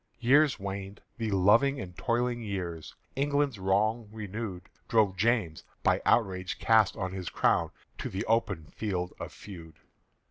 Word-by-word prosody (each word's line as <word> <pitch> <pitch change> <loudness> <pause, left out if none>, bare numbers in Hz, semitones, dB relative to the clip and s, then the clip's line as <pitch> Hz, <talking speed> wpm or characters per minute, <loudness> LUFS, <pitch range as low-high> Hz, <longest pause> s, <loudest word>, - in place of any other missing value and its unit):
Years 140 +4 +4
waned, 100 0 -6 0.2
the 110 -1 -1
loving 105 +9 +4
and 90 -2 -7
toiling 120 +2 0
years: 90 -7 -5 0.2
Till 135 - -2
England's 145 -5 0
wrong 105 +4 +1
renewed 105 -3 -5 0.2
Drove 105 -4 +3
James, 105 -6 +1 0.2
by - - +3
outrage 95 -5 +1
cast 110 -3 +3
on 95 -1 -3
his 95 -3 -5
crown, - - +2 0.3
To - - -3
the 95 +4 -3
open 105 -8 0
field 90 0 -3
of - - -6
feud. 85 -5 -11
105 Hz, 145 wpm, -29 LUFS, 95-115 Hz, 0.3 s, Years